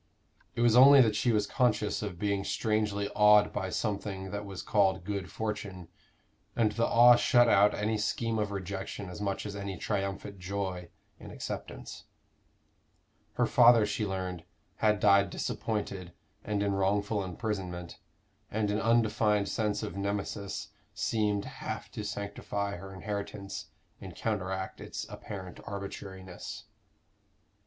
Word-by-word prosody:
It - - -1
was 120 -1 +5
only 135 +3 +9
that 110 -4 +3
she 115 +3 +2
was 105 -2 +2
conscious 110 -3 +1
of 100 -4 -4
being 100 +1 0
strangely 105 -1 0
awed 105 0 +5
by 95 -2 -2
something 100 -2 -3
that 100 0 -4
was 95 -2 -6
called 95 -3 +2
good 100 -1 -4
fortune; 100 -5 -4 0.7
and 110 -2 +3
the 115 +2 +1
awe 120 +1 +8
shut 120 0 +4
out 105 -2 +5
any 105 +1 0
scheme 110 +2 -1
of 105 -1 0
rejection 95 0 -5
as 90 - -8
much 100 0 -2
as 105 -1 -5
any 100 -2 -5
triumphant 100 0 -3
joy 90 -2 -4 0.3
in - - -10
acceptance. - - -7 1.3
Her - - +2
father, 120 -2 +6
she 105 +1 -2
learned, 95 -3 -3 0.3
had 105 -1 +2
died 100 -1 +5
disappointed 100 -5 -3 0.3
and 100 -1 -1
in 100 -1 +1
wrongful 100 +1 +1
imprisonment, 90 -3 -4 0.5
and 105 -1 0
an 105 - 0
undefined 110 -3 +2
sense 105 -1 -1
of 105 - -5
Nemesis 100 0 -3 0.3
seemed 105 -2 0
half - - -6
to 105 - -5
sanctify 100 0 -3
her 95 +2 -9
inheritance, 100 0 -5 0.3
and - - -9
counteract 95 -3 -3
its - - -5
apparent 95 -3 -8
arbitrariness. 95 -2 -7
100 Hz, 135 wpm, -30 LUFS, 95-105 Hz, 1.3 s, only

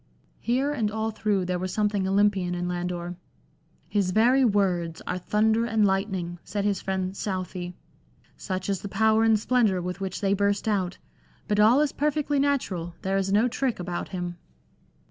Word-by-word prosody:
Here 260 +5 0
and 230 -8 0
all 220 +1 -2
through 210 -3 0
there 180 0 -1
was 185 0 -3
something 205 -1 0
Olympian 195 -2 +2
in 175 0 -2
Landor. 175 0 -3 0.4
" - - -38 0.3
His 200 -3 0
very 240 +7 +4
words 185 -7 +1
are 180 - -2
thunder 220 +4 +2
and 220 -2 +2
lightning," 190 -3 -1
said 205 -1 -3
his 205 -2 0
friend 190 0 -2
Southey, 185 -3 -4 0.3
" - - -34
such 185 0 -4
is 195 -3 -1
the 200 - -6
power 220 +1 +3
and 225 -1 +4
splendour 220 -5 +2
with 180 +1 -5
which 190 -1 -3
they 195 -1 +1
burst 200 +1 0
out. 190 -4 0 0.5
But 210 -1 +1
all 230 +7 +6
is 300 -2 +1
perfectly 295 -1 0
natural; 195 -12 -1
there 195 +1 0
is 195 0 0
no 215 +4 +4
trick 250 -2 -1
about 175 -1 -4
him." 175 -1 -4
200 Hz, 180 wpm, -26 LUFS, 180-220 Hz, 0.5 s, all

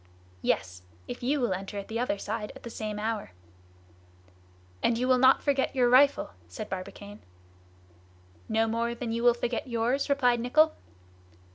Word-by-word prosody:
"Yes! 90 0 -1 0.3
if - - -7
you 275 +4 +1
will 240 -7 +1
enter 195 +2 -6
at 200 - -5
the 225 +1 -3
other 240 -4 0
side 210 +1 -4
at - - -13
the 235 - -7
same 215 -1 -4
hour." 215 - -3 1.5
"And 235 - +2
you 250 +2 0
will 255 -1 +4
not 260 +1 +5
forget 275 -1 +1
your 250 -2 +4
rifle?" 280 +3 +5 0.2
said 90 - -7
Barbicane. 200 +2 -7 1.3
"No 225 +1 +2
more 230 +1 -1
than 235 -1 -4
you 230 +1 -1
will 240 0 +5
forget 240 +1 -3
yours?" 240 +4 0
replied 250 -4 +3
Nicholl. 310 +7 +3
235 Hz, 160 wpm, -28 LUFS, 210-255 Hz, 1.5 s, not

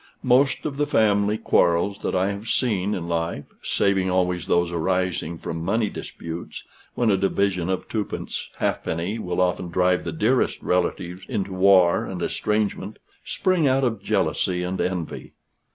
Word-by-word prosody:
Most 135 +2 +3
of 145 -3 -3
the 145 0 +1
family 105 -4 +2
quarrels 85 +1 +2
that - - -2
I 95 +2 +2
have 100 +3 -7
seen 105 -5 0
in 85 -2 -4
life 85 -3 -2 0.2
(saving 95 -2 +1
always 90 -2 0
those 85 0 +2
arising 85 -1 -1
from 80 0 -5
money 110 +3 0
disputes, 85 +1 -7 0.3
when 120 -3 +2
a 95 - +3
division 95 -2 0
of 95 - -2
twopence 105 -2 -4
halfpenny 85 +7 -2
will 90 -4 -3
often 90 -1 0
drive 90 +1 +2
the 85 - -3
dearest 110 +10 +1
relatives 90 0 -1
into 100 -1 -3
war 95 -2 +5
and - - -5
estrangement,) 105 -1 -1 0.3
spring 185 -5 +1
out 135 +1 +2
of 115 -5 0
jealousy 90 -1 0
and 90 +1 -2
envy. 90 -3 -3
95 Hz, 150 wpm, -24 LUFS, 90-105 Hz, 0.3 s, war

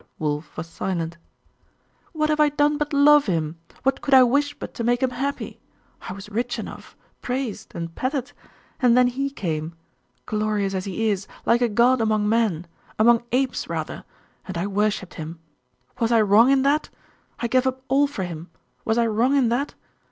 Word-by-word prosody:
Wulf 150 0 -3
was 160 - -4
silent. 170 0 -4 0.9
'What 305 -2 0
have 305 - 0
I 300 -1 +5
done 295 +1 +1
but 295 +1 -2
love 290 -1 +5
him? 165 -3 -1 0.2
What 270 0 +1
could 280 - +3
I 260 - +9
wish 285 +4 +1
but - - -8
to 235 - -4
make 245 +2 +1
him 260 - +1
happy? 275 +3 -4 0.5
I - - -4
was 195 +1 -9
rich 235 +3 -2
enough, - - -9 0.2
praised, 245 -4 -4
and 165 -1 -5
petted;.... 260 - -2 0.5
and 245 -1 +5
then 250 - +6
he 270 +3 -1
came,.... 165 - -4 0.5
glorious 210 -2 -1
as 185 -1 -2
he 215 +3 0
is, 195 -1 -3 0.2
like 235 +1 +3
a 240 - +3
god 240 +3 +3
among 215 -1 +1
men 210 -7 +1 0.3
among 230 +1 +5
apes 255 +1 0
rather - - -4 0.4
and 185 -3 -5
I 170 - -1
worshipped 205 -1 -1
him: 160 +2 -7 0.6
was 230 -1 +1
I 230 -1 +5
wrong 215 +4 +5
in 270 -1 +4
that? 290 +2 +1 0.5
I - - -2
gave 255 +2 +2
up 260 0 -3
all 285 +2 +3
for 240 -9 -5
him: 170 -1 -7 0.3
was 220 +1 0
I 235 - +3
wrong 230 +5 +2
in 260 -4 +3
that? 270 +5 -1
235 Hz, 185 wpm, -23 LUFS, 195-265 Hz, 0.9 s, I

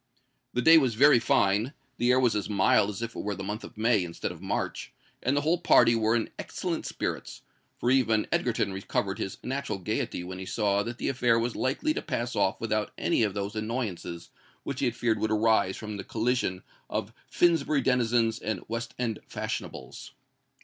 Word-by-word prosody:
The 125 - 0
day 165 +3 +8
was 130 -6 0
very 140 +1 +6
fine: 110 +3 +2 0.2
the 120 - +1
air 125 +1 +5
was 125 -4 +3
as 105 0 -2
mild 100 0 +3
as 105 +3 -5
if 115 0 -5
it - - -5
were 105 0 -3
the 95 - -6
month 105 +2 -4
of - - -11
May 110 -3 +3
instead 85 -1 -4
of - - -11
March; - - -3 0.3
and 135 +3 +1
the - - +2
whole 165 +4 +1
party 120 -8 +5
were 110 0 +2
in 115 - -1
excellent - - -3
spirits—for 120 - -4
even 115 -5 +3
Egerton 95 - 0
recovered 95 0 -2
his 95 - -4
natural 135 -5 -3
gaiety 90 -1 -3
when 90 +1 -7
he 95 - -6
saw 100 +1 +1
that 120 +3 -5
the - - -3
affair 120 -3 +2
was 115 +1 -1
likely 145 - 0
to - - -3
pass 120 +1 -3
off 95 - +1
without 110 -1 -1
any - - +1
of 105 -3 +1
those 100 +1 -3
annoyances 110 -7 -4 0.3
which 140 -1 -4
he - - +1
had 120 - -2
feared 115 -2 0
would 110 - 0
arise 110 -3 +2
from 105 -1 -6
the 95 - -5
collision 110 -5 -1 0.3
of - - -3 0.2
Finsbury 155 -4 +3
denizens 120 -2 +2
and 105 -4 -3
West 115 +1 -4
End 115 -3 -2
fashionables. - - -6
115 Hz, 195 wpm, -28 LUFS, 100-125 Hz, 0.3 s, day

